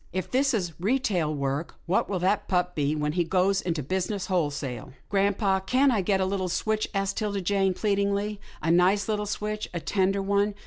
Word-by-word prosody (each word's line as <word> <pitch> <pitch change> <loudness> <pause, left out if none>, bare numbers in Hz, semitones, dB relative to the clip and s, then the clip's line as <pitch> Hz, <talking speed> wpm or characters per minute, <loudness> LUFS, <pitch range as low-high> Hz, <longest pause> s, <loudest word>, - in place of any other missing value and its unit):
If 185 0 -4
this 270 0 +2
is 175 -6 -2
retail 195 - +1
work, 140 +2 -2
what 185 - +1
will 195 - 0
that 200 +3 +1
pup 180 -1 +1
be 150 -2 0
when 150 0 -1
he 175 +2 +1
goes 190 +3 +2
into 165 -4 -2
business 190 +6 -2
wholesale? 145 -7 -2
" - - -31
" - - -38
Grampa, 200 -1 +2
can't 260 +7 +3
I 220 -5 +2
get 195 +1 +1
a 190 - +2
little 190 -1 -1
switch," 215 +4 0
asked 195 -1 -1
'Tilda 205 -2 -1
Jane 195 0 +1
pleadingly, 200 0 0
" - - -22
a 165 - +2
nice 185 +4 +3
little 210 -1 -1
switch 210 +1 -3
— - - -28
a - - 0
tender 195 +3 +1
one? 200 +1 +1
195 Hz, 215 wpm, -27 LUFS, 175-205 Hz, -, can't